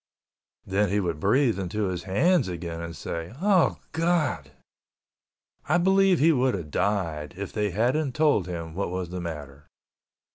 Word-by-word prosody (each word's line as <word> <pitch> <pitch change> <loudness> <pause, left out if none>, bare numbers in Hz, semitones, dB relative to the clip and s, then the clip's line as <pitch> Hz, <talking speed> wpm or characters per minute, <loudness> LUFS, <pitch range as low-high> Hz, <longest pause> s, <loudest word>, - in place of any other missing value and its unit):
Then 100 +1 +1
he 100 +2 +1
would 85 -5 -2
breathe 115 - +2
into 100 +3 -2
his 90 -3 -3
hands 150 - +2
again, 85 -1 -5
saying, 85 +6 -6
"Oh 190 -2 +3
God!" 160 - 0 1.2
I 165 - +4
believe 190 +1 +4
he 160 +3 +5
would 130 -4 +2
have 80 -6 -6
died 80 -7 -1
if 100 0 -6
they 105 -1 0
hadn't 125 - 0
told 150 - +2
him 85 -2 -5
what 100 +2 -2
was 90 -1 -4
the 90 0 -4
matter. 75 -4 -7
100 Hz, 150 wpm, -26 LUFS, -, 1.2 s, he